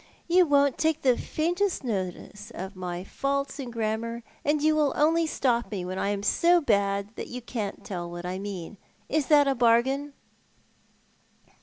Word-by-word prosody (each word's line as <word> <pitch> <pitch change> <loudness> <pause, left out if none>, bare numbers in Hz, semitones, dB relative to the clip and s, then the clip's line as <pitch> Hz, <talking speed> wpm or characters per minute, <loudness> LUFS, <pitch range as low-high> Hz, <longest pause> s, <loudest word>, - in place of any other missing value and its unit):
You 355 0 +5
won't 285 -2 +3
take 320 -1 +1
the 255 -2 +5
faintest 350 +6 -1
notice 205 -1 -4
of 190 +3 -6
my 180 -1 -5
faults 275 +6 -2
in 260 -3 -5
grammar, 230 +1 -3 0.2
and 295 +1 +2
you 310 +1 +3
will 300 -3 +2
only 325 +2 +3
stop 240 -5 0
me 190 -4 -4
when 185 +1 -4
I 200 - 0
am 200 -1 -2
so 345 +11 +4
bad 200 -5 0
that - - -5
you 250 - -6
can't 225 -4 -5
tell 175 -3 -5
what 175 0 -7
I 185 +1 -3
mean. 195 -1 -6 0.3
Is 305 -1 0
that 290 -2 +5
a 275 - +3
bargain?" 260 +4 +2
235 Hz, 170 wpm, -27 LUFS, 200-290 Hz, 0.3 s, You